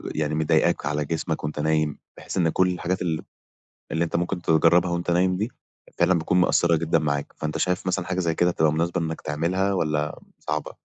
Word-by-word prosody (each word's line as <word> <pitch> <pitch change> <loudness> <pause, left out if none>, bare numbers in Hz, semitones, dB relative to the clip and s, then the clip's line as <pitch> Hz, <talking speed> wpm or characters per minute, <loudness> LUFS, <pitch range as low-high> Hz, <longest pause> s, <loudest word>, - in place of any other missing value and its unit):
يعني 75 0 -1
مضايقاك 80 0 +2
على 75 +1 -1
جسمك 80 +2 -3
وأنت 75 0 -4
نايم 75 -1 +1 0.2
بحيث - - -6
إن 85 -3 +3
كل 95 +3 +2
الحاجات 90 +1 -2
ال 80 -3 -1 0.7
اللي 80 +1 +1
أنت 80 - -5
ممكن 90 +1 -1
تجرّبها 85 +2 +4
وأنت 85 0 -1
نايم 90 +1 +2
دي 110 +5 -2 0.5
فعلًا 95 - +4
بتكون 90 +3 +1
مأثّرة 85 -1 +3
جدًا 80 0 +1
معاك، 70 -2 -2
فأنت 75 0 -3
شايف 90 +1 -1
مثلًا 90 0 0
حاجة 95 0 -2
زي 85 -3 0
كده 90 0 +3
تبقى 80 -2 +2
مناسبة 85 +2 0
إنّك 80 0 -4
تعملها 95 +6 0
والّا 75 -4 -1 0.2
صعبة؟ - - -3
85 Hz, 195 wpm, -24 LUFS, 80-90 Hz, 0.7 s, تجرّبها